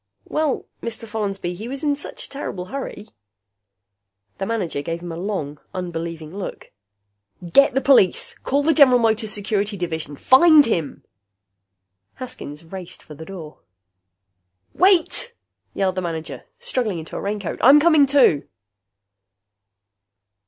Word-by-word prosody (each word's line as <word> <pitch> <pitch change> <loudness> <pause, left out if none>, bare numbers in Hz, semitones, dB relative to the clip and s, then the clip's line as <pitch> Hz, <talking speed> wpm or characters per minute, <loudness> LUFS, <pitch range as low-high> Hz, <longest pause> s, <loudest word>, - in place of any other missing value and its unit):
"Well, 305 -3 -1 0.2
Mr. 230 0 -4
Follansby, 200 -4 -3
he 210 +6 -7
was 275 +4 -5
in 290 -1 +1
such 285 - -6
a - - -11
terrible 195 -10 -5
hurry 265 -5 -6 0.6
" 100 0 -53
The 195 - -2
manager 190 -10 -2
gave 165 +3 -4
him 175 -1 -7
a - - -5
long, 165 -6 -4
unbelieving 165 -2 -5
look. 200 - -7 0.8
"Get 275 -1 +5
the 270 - +2
police! 255 -11 +3
Call 280 +2 0
the 320 +2 +3
General 270 -4 +6
Motors 220 -2 +1
Security 205 0 -1
Division! 160 -4 -4
Find 295 - +6
him!" 165 -10 -2 1.1
Haskins 165 - -8
raced 180 +1 -9
for 155 - -12
the 160 +2 -10
door. 165 -5 -10 1.1
"Wait!" 385 +6 +2 0.4
yelled 190 -1 +1
the 185 - -3
manager, 165 -2 -5
struggling 255 - -2
into 160 -1 -8
a - - -4
raincoat. 200 -2 -4
"I'm 275 +5 +8
coming, 305 -3 +5
too." 260 - +3
200 Hz, 135 wpm, -21 LUFS, 165-270 Hz, 1.1 s, I'm